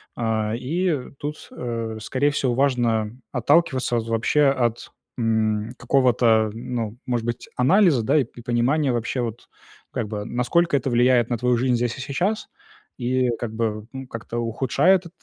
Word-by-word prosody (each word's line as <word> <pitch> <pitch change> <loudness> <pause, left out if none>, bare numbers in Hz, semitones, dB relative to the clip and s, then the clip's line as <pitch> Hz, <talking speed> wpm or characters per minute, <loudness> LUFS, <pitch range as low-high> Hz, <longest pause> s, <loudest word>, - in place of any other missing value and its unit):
А, 110 -2 -1
и, 155 +2 -1
тут, 150 +1 -6
э, 115 -2 -4
скорее 140 +6 +1
всего, 135 -3 0
важно, 120 -5 +1
э, - - -16 0.2
отталкиваться 130 -1 +2
от, 115 -1 -3
вообще, 115 +6 +2
от, 120 -4 0 0.3
м, 110 -1 0
какого-то, 120 -4 +3
ну, 115 -1 -4
может 120 -3 -1
быть, 120 0 -4
анализа, 150 - +4
да, 110 - +2
и 145 - +4
п 120 - -14
понимания 130 +4 +1
вообще, 120 +2 -1
вот, 115 -1 -5 0.4
как 110 - -3
бы, 105 -1 -5
насколько 140 +9 +1
это 135 0 -2
влияет 120 0 +3
на 120 - 0
твою 125 +1 +2
жизнь 125 +1 +2
здесь 120 0 -1
и - - -6
сейчас, 180 - -1 0.5
и, 125 0 +1
как 115 -2 -4
бы, 110 -1 -2
ну, 135 0 -7
как-то 115 0 -5
ухудшает 135 - +2
т 170 - -10
120 Hz, 165 wpm, -23 LUFS, 115-135 Hz, 0.5 s, анализа